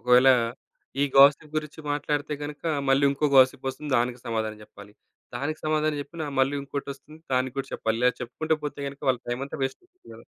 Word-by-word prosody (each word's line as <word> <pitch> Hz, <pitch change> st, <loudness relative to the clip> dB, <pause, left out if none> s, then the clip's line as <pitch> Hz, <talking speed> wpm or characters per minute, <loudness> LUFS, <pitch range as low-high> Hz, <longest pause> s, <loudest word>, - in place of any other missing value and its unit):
ఒకవేళ 125 Hz, +3 st, +5 dB, 0.7 s
ఈ -, -, +5 dB
గాసిప్ 145 Hz, +2 st, +6 dB
గురించి 155 Hz, 0 st, -4 dB
మాట్లాడితే 145 Hz, 0 st, -1 dB
గనుక, 145 Hz, 0 st, -7 dB, 0.3 s
మళ్ళీ 135 Hz, +1 st, +4 dB
ఇంకో 145 Hz, +2 st, 0 dB
గాసిప్ 130 Hz, 0 st, +5 dB
వస్తుంది 145 Hz, +2 st, -6 dB
దానికి 120 Hz, +1 st, -1 dB
సమాధానం 110 Hz, -2 st, -2 dB
జెప్పాలి. 105 Hz, 0 st, -14 dB, 0.4 s
దానికి 150 Hz, +5 st, -3 dB
సమాధానం 155 Hz, -1 st, +1 dB
జెప్పినా, 155 Hz, +1 st, -7 dB
మళ్ళీ 135 Hz, +2 st, +2 dB
ఇంకోటొస్తుంది 140 Hz, +2 st, -7 dB
దానికి 130 Hz, +1 st, 0 dB
కూడా 135 Hz, 0 st, -3 dB
చెప్పాలి. 110 Hz, 0 st, -1 dB
ఇలా 125 Hz, -, +6 dB
చెప్పుకుంటూ 155 Hz, +6 st, -1 dB
పోతే 145 Hz, -1 st, -4 dB
గనుక, 140 Hz, 0 st, -11 dB
వాళ్ళ 125 Hz, -2 st, +2 dB
టైమంతా 135 Hz, +5 st, -4 dB
వేస్టవుతుంది 360 Hz, -, -8 dB
గదా! -, -, -14 dB
140 Hz, 170 wpm, -26 LUFS, 125-150 Hz, 0.7 s, గాసిప్